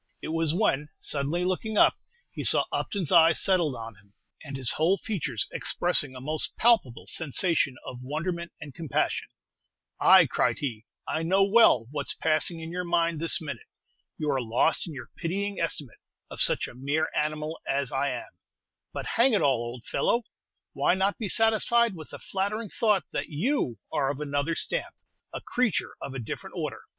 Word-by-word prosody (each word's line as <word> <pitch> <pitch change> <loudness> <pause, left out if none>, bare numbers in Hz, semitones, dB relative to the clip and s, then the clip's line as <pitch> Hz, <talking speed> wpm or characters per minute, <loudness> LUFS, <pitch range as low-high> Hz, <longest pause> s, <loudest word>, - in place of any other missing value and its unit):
It - - -6
was 165 -1 +1
when, 150 -6 +1
suddenly 150 +5 -1
looking 210 +4 -2
up, - - +6 0.4
he - - -5
saw - - +3
Upton's 190 -8 -2
eyes 165 -2 +6
settled 175 -8 +2
on 115 -1 -7
him, 100 0 -25 0.3
and 140 -3 -6
his 130 -3 +1
whole 170 +5 +2
features 150 - -2
expressing 145 -7 +2
a - - -7
most 150 +4 -3
palpable 220 - +3
sensation 160 -2 +1
of 125 - -7
wonderment 170 +6 -4
and 145 -3 -9
compassion. 160 -1 -1 0.7
"Ay," - - +7
cried - - 0
he, 115 -6 -4 0.2
"I 155 - -1
know 190 +4 +3
well 200 - +5
what's 145 -1 -2
passing 160 +1 +1
in 160 +1 -7
your 180 +1 -3
mind 170 -2 +1
this 165 +1 +2
minute. 155 -3 -7 0.5
You 150 -1 -1
are 135 -2 0
lost 120 +10 +2
in 165 - -7
your 125 -3 -9
pitying 200 +4 -3
estimate 150 -7 -2 0.3
of - - -5
such - - +2
a - - -11
mere 140 +5 -1
animal 155 +1 -2
as 140 -2 -1
I 140 +1 0
am; 125 -2 -6 0.6
but, - - -5
hang 240 +2 +3
it 210 - +2
all, 135 -4 +3
old 120 0 -7
fellow, 235 +1 +1 0.5
why - - +2
not 195 +2 0
be 215 -4 -3
satisfied 225 +2 +3
with 155 -3 -10
the - - -8
flattering 205 +3 -3
thought 210 -4 +2
that - - -3
you 160 - -1 0.2
are 135 -2 +1
of 140 0 -3
another 145 +2 -1
stamp, - - -2 0.4
a - - -6
creature 245 -7 -1
of 135 - -6
a - - -3
different 115 - -7
order?" - - -4
160 Hz, 180 wpm, -27 LUFS, 140-190 Hz, 0.7 s, Ay